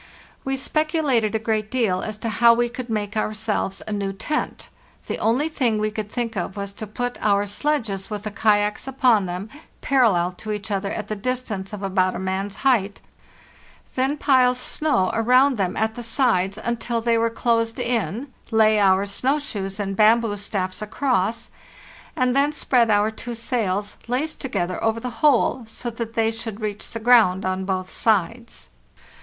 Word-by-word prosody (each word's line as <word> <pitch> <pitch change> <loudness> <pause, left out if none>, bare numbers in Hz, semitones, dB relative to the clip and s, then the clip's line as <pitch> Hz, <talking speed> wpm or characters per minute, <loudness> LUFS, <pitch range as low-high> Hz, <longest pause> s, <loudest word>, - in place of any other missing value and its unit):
We 270 0 -1
speculated 280 -7 0
a 220 0 -2
great 215 -1 0
deal 215 -8 +1
as 215 -1 -5
to - - +1
how 230 +2 +5
we 240 0 +1
could 250 0 -7
make 210 -1 -2
ourselves 215 -2 -2
a - - -4
new 200 -2 -2
tent. 300 +10 -3 0.4
The - - -4
only 250 +7 +2
thing 255 -9 0
we 215 0 0
could 210 -1 -5
think 235 -2 -3
of 190 +2 -4
was 200 0 -4
to 215 - -7
put 245 +4 -4
our 205 -1 +2
sledges, 205 -3 -1
with 210 -1 -5
the 215 - -4
kayaks 210 +1 +1
upon 250 -7 +3
them, 180 +3 -5 0.3
parallel 215 -10 +3
to 215 - -5
each 210 0 -6
other 195 0 -1
at 210 0 -4
the 215 - -3
distance 215 -3 -3
of 205 -1 -7
about 185 -1 +1
a - - -4
man's 190 +1 -3
height, 205 -7 +2 0.9
then 265 +3 0
pile 255 -3 +4
snow 250 -6 +1
around 250 +4 +4
them 190 -3 -1
at 220 0 0
the 240 - -7
sides 225 -6 +1
until 235 +1 -2
they 230 0 +1
were 230 0 +2
closed 230 0 0
in, 240 - -2 0.2
lay 220 -1 +4
our 195 0 +4
snow 255 +8 0
shoes 200 -8 -4
and 195 -1 -2
bamboo 220 +1 +4
staffs 195 -2 -3
across, 230 -1 -1 0.6
and 255 -4 +1
then 285 +2 +3
spread 245 -5 +2
our 210 +1 +3
two 235 +2 -6
sails, 210 -4 -1
laced 270 +6 -2
together, 185 -8 -2
over 225 0 +1
the 250 +2 -5
whole, 265 -4 +3
so 235 +2 -5
that 230 0 -6
they 225 0 +2
should 225 -2 -6
reach 210 -2 -4
the 230 - -6
ground 215 -5 +4
on 185 0 -1
both 185 -1 -2
sides. 225 +2 -1
220 Hz, 175 wpm, -23 LUFS, 200-245 Hz, 0.9 s, how